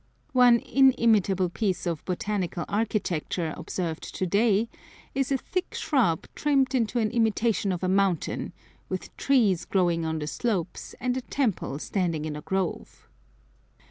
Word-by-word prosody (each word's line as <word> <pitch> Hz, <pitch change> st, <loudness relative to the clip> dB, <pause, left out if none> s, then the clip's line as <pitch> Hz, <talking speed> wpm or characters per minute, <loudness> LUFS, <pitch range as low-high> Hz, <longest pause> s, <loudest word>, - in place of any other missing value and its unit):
One 245 Hz, -2 st, +6 dB
inimitable 220 Hz, -8 st, +3 dB
piece 190 Hz, 0 st, -1 dB
of 170 Hz, -4 st, -2 dB
"botanical 185 Hz, -2 st, -2 dB
architecture" 185 Hz, -6 st, -1 dB
observed 170 Hz, -3 st, -4 dB
to 185 Hz, -, -1 dB
day 205 Hz, +3 st, +2 dB, 0.5 s
is 270 Hz, 0 st, -1 dB
a 270 Hz, -, +3 dB
thick 365 Hz, +7 st, -4 dB
shrub 255 Hz, -, +1 dB
trimmed 275 Hz, -3 st, +2 dB
into 240 Hz, -2 st, +1 dB
an 220 Hz, -2 st, +1 dB
imitation 225 Hz, -3 st, +1 dB
of 180 Hz, 0 st, -3 dB
a -, -, +1 dB
mountain, 190 Hz, -2 st, 0 dB, 0.4 s
with -, -, -5 dB
trees 225 Hz, -11 st, +2 dB
growing 175 Hz, -3 st, +1 dB
on 160 Hz, 0 st, -1 dB
the 150 Hz, -, -3 dB
slopes, 180 Hz, +1 st, -3 dB
and 250 Hz, 0 st, 0 dB
a -, -, -2 dB
temple 230 Hz, -, -1 dB
standing 165 Hz, -2 st, -1 dB
in 155 Hz, -1 st, -4 dB
a 150 Hz, -, -6 dB
grove. 190 Hz, +1 st, -3 dB
200 Hz, 140 wpm, -27 LUFS, 175-240 Hz, 0.5 s, One